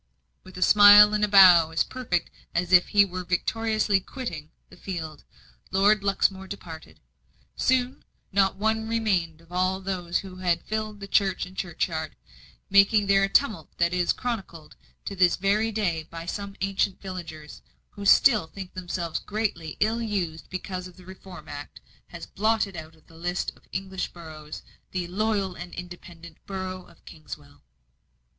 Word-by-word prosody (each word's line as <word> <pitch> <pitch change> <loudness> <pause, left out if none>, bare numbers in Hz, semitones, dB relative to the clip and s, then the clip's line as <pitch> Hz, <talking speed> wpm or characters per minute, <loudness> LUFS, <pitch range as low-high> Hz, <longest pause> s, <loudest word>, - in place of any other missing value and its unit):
With 185 -1 -13
a 185 - +1
smile 210 0 +8
and 210 0 +1
bow 180 -5 +8
as 160 0 +1
perfect 220 -10 -3 0.2
as 175 +1 -1
if 180 -1 +7
he 205 -1 +5
were 185 -1 -6
victoriously 215 +3 0
quitting 180 - -7 0.2
the - - -13
field, 160 -5 -7 0.5
Lord 200 +2 +3
Luxmore 195 -1 0
departed. 165 -5 -10 0.6
Soon 255 0 0 0.3
not 195 0 +2
one 220 +2 -1
remained 185 -8 -1
of 170 +1 -22
all 185 +1 0
those 180 -3 -2
who 185 -1 -10
had 175 -2 0
filled 215 -1 -4
the 200 - -6
church 195 -2 +1
and 185 - -14
churchyard, 160 -3 -3 0.5
making 200 +2 +4
there 195 0 +4
a 195 - +1
tumult 205 - 0
that 170 0 +1
is 180 -1 +2
chronicled 195 -10 -5 0.3
to 200 - -5
this 180 -2 +4
very 210 +4 +1
day 190 -7 -1
by 165 +1 -9
some 200 +2 -5
ancient 195 0 0
villagers, 165 -5 -8 0.3
who 205 - -9
still 210 -2 +5
think 185 +2 -9
themselves 175 -3 -4
greatly 205 -7 -3
ill 225 +2 +1
used 185 -8 -3
because 185 0 -5
the 180 0 -17
Reform 185 -3 -12
Act 145 0 -9 0.3
has 170 - -9
blotted 215 -2 0
out 160 0 -9
of 160 - -26
the - - -20
list 175 +2 -2
of - - -25
English 190 0 -4
boroughs 155 -3 -10 0.3
the 180 -1 -2
"loyal 200 -1 -1
and 175 -1 -9
independent" 175 -2 -10
borough 185 -1 -5
of 170 - -22
Kingswell. 150 -2 -11
185 Hz, 155 wpm, -26 LUFS, 170-205 Hz, 0.6 s, smile